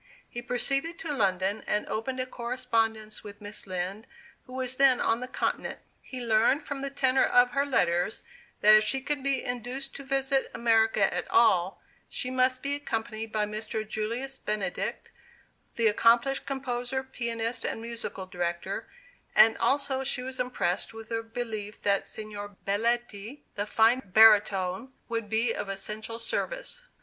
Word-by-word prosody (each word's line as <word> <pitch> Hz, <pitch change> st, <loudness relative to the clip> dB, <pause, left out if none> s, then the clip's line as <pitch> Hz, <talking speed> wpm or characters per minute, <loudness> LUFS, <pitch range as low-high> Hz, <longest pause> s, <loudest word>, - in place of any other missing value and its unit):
He 240 Hz, -, -6 dB
proceeded 275 Hz, +7 st, 0 dB
to 310 Hz, -3 st, -4 dB
London, 195 Hz, -3 st, 0 dB
and 210 Hz, -, 0 dB
opened 255 Hz, +4 st, -3 dB
a 255 Hz, -, 0 dB
correspondence 230 Hz, -3 st, -2 dB
with 205 Hz, -1 st, -10 dB
Miss 205 Hz, 0 st, -8 dB
Lind, 185 Hz, +3 st, -4 dB, 0.4 s
who 255 Hz, -, -11 dB
was 255 Hz, 0 st, -2 dB
then 270 Hz, -2 st, +5 dB
on 225 Hz, -, +1 dB
the 250 Hz, -, -5 dB
Continent. -, -, -2 dB, 0.2 s
He 250 Hz, -2 st, -7 dB
learned 230 Hz, +6 st, +3 dB
from 280 Hz, -1 st, -4 dB
the 275 Hz, -, -2 dB
tenor 265 Hz, -1 st, +3 dB
of 245 Hz, 0 st, +4 dB
her 280 Hz, +2 st, +1 dB
letters, 175 Hz, -6 st, +1 dB, 0.4 s
that 210 Hz, +1 st, +8 dB
if 215 Hz, -, +6 dB
she 215 Hz, +5 st, +1 dB
could 280 Hz, +1 st, -2 dB
be 275 Hz, -1 st, 0 dB
induced 250 Hz, +3 st, -4 dB
to 275 Hz, -, -8 dB
visit 270 Hz, 0 st, +1 dB
America 225 Hz, -3 st, +3 dB
at -, -, -3 dB
all, 190 Hz, -6 st, +3 dB, 0.3 s
she 250 Hz, -, -3 dB
must 255 Hz, 0 st, +2 dB
be 280 Hz, 0 st, -1 dB
accompanied 225 Hz, -5 st, -4 dB
by 215 Hz, -1 st, +1 dB
Mr. 215 Hz, +1 st, -4 dB
Julius 230 Hz, +6 st, -3 dB
Benedict, 210 Hz, -2 st, -3 dB, 0.6 s
the 230 Hz, -, +1 dB
accomplished 235 Hz, +5 st, +3 dB
composer, 265 Hz, -1 st, -2 dB
pianist, 235 Hz, -2 st, -3 dB
and -, -, -2 dB
musical 230 Hz, -4 st, -5 dB
director, 175 Hz, -2 st, -3 dB, 0.5 s
and 220 Hz, +1 st, +7 dB
also 270 Hz, -1 st, +1 dB
she 260 Hz, -1 st, -1 dB
was 260 Hz, 0 st, -6 dB
impressed 225 Hz, -4 st, -1 dB
with 225 Hz, 0 st, -10 dB
the 225 Hz, 0 st, -1 dB
belief 225 Hz, -2 st, -5 dB
that 200 Hz, -1 st, +2 dB
Signor 205 Hz, -1 st, -6 dB
Belletti, 230 Hz, +3 st, -1 dB
the 205 Hz, 0 st, -3 dB
fine 225 Hz, +4 st, +4 dB
baritone, 205 Hz, +2 st, +4 dB, 0.2 s
would 230 Hz, -2 st, -3 dB
be 225 Hz, +2 st, +1 dB
of 200 Hz, -, -4 dB
essential 215 Hz, +3 st, -5 dB
service. -, -, -3 dB
230 Hz, 155 wpm, -28 LUFS, 215-260 Hz, 0.6 s, that